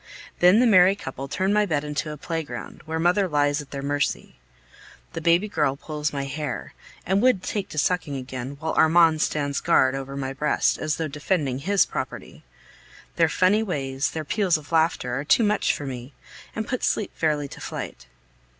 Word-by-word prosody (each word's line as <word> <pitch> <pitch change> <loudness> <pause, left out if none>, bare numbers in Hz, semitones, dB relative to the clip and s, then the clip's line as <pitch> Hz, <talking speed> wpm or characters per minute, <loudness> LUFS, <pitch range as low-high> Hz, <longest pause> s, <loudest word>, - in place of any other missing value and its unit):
Then 180 +5 +6
the 250 - +5
merry 190 -3 +6
couple 135 -7 -7
turn 190 +7 0
my 210 0 +4
bed 150 -4 0
into 150 +1 -3
a 150 - -7
playground, 160 +1 -5
where 160 0 -3
mother 180 +4 +2
lies 145 -2 +1
at 145 - -13
their 140 -1 -6
mercy. 145 0 -1 0.8
The 165 - -4
baby 170 +5 +3
girl 145 -9 0
pulls 150 +1 -3
my 140 -1 -3
hair, 145 +2 -5 0.3
and 190 +3 +2
would 250 -7 +3
take 205 -2 -3
to - - -9
sucking 160 -2 0
again, 130 +1 -6
while 160 0 -2
Armand 160 -1 +4
stands 145 -3 -1
guard 130 0 +3
over 135 0 -5
my 135 -1 -3
breast, 150 +2 +1
as 155 -1 -1
though 160 - -2
defending 145 -2 -1
his 195 +7 +3
property. - - -6 0.7
Their 165 -2 +4
funny 190 +6 +3
ways, 135 -9 -2
their 160 -1 -5
peals 185 0 +1
of 150 0 -13
laughter, 160 -6 +1
are - - -3
too 225 - +4
much 210 0 +2
for 145 - -5
me, 130 0 -7 0.4
and 220 -1 -3
put 255 - -3
sleep 215 - 0
fairly 150 -3 0
to - - -11
flight. - - -7
155 Hz, 185 wpm, -24 LUFS, 140-180 Hz, 0.8 s, Then